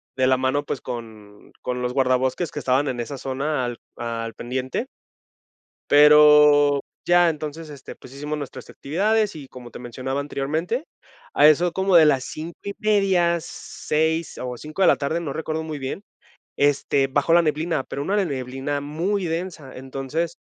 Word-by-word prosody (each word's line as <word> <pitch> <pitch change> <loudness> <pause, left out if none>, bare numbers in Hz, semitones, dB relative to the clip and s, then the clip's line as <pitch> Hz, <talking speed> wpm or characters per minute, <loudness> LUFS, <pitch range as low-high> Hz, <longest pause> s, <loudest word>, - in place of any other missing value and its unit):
de 130 0 +2
la 130 -1 +4
mano, 130 +2 0
pues 135 - -4
con 110 -4 -9
con 125 0 -3
los 125 0 -2
guardabosques 130 +4 +1
que 150 - -5
estaban 135 +2 +1
en 125 -2 -3
esa 135 +4 -5
zona 135 +2 -2
al 120 -1 -4 0.2
al 115 -1 -4
pendiente. 130 - -4 1.0
Pero, 150 -1 +7 0.3
ya 175 -1 +5
entonces 155 0 -5
este 140 -3 -10
pues 130 - -14
hicimos 150 +2 -4
nuestras 145 -2 -8
actividades 205 +6 0
y 140 -3 -9
como 125 -2 -11
te - - -10
mencionaba 130 +3 -4
anteriormente 160 - -3 0.5
a - - +6
eso 165 +3 +4
como 190 -1 +3
de 160 -2 +8
las 130 -3 +2
5:30, 185 +1 0
6 160 +2 -2
o 125 -1 -4
5 155 +8 -8
de 190 - +6
la - - +5
tarde, 150 +5 -2
no 145 -5 -5
recuerdo 160 0 -3
muy 155 -2 -5
bien 135 +9 -5 0.6
este 140 -1 +2
bajó 145 +4 0
la 170 - +7
neblina, 160 -1 0
pero 140 - -5
una 195 +7 -1
neblina 135 0 -3
muy 175 +7 -2
densa. 165 -4 -5
Entonces, 135 +6 -4
145 Hz, 160 wpm, -23 LUFS, 130-165 Hz, 1.0 s, de